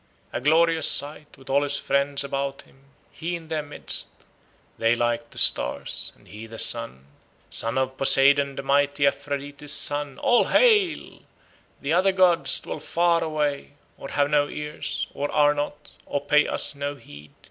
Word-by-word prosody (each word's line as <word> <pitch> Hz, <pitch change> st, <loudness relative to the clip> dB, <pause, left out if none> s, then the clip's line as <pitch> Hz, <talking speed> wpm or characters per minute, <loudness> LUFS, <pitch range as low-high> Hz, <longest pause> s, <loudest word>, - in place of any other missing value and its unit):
A 120 Hz, -, -3 dB
glorious 160 Hz, +3 st, +3 dB
sight, 145 Hz, +1 st, 0 dB
with 135 Hz, 0 st, -19 dB
all 140 Hz, +1 st, +2 dB
his 145 Hz, 0 st, 0 dB
friends 140 Hz, 0 st, 0 dB
about 140 Hz, 0 st, -4 dB
him, 135 Hz, +1 st, -25 dB, 0.3 s
He 175 Hz, +2 st, -5 dB
in 165 Hz, -2 st, -10 dB
their 160 Hz, -1 st, -2 dB
midst, 145 Hz, 0 st, -3 dB, 0.7 s
They 115 Hz, +1 st, +2 dB
like 120 Hz, 0 st, -2 dB
to -, -, -14 dB
stars, -, -, +1 dB
and -, -, -24 dB
he 110 Hz, +2 st, -10 dB
the 115 Hz, 0 st, -11 dB
sun. 65 Hz, -, +1 dB, 0.5 s
Son 115 Hz, +3 st, 0 dB
of 130 Hz, 0 st, -2 dB
Poseidon 140 Hz, +1 st, +4 dB
the -, -, -6 dB
mighty, 140 Hz, +1 st, +1 dB
Aphrodite's 145 Hz, +1 st, -3 dB
son, 145 Hz, -2 st, 0 dB
All 245 Hz, -, +3 dB
hail! 420 Hz, -9 st, +2 dB, 0.6 s
The 145 Hz, +3 st, -1 dB
other 190 Hz, +2 st, +3 dB
gods 185 Hz, -3 st, +3 dB
dwell -, -, -7 dB
far 170 Hz, -1 st, +1 dB
away, 150 Hz, -3 st, -3 dB, 0.2 s
Or 135 Hz, -, -10 dB
have 145 Hz, 0 st, 0 dB
no 145 Hz, -1 st, +2 dB
ears, 150 Hz, 0 st, -5 dB
Or 145 Hz, +1 st, -4 dB
are 145 Hz, 0 st, +3 dB
not, 145 Hz, 0 st, -6 dB, 0.2 s
or 145 Hz, -, -2 dB
pay 150 Hz, +1 st, +2 dB
us -, -, 0 dB
no 140 Hz, 0 st, -5 dB
heed. 75 Hz, -, -15 dB
145 Hz, 165 wpm, -24 LUFS, 135-150 Hz, 0.7 s, Poseidon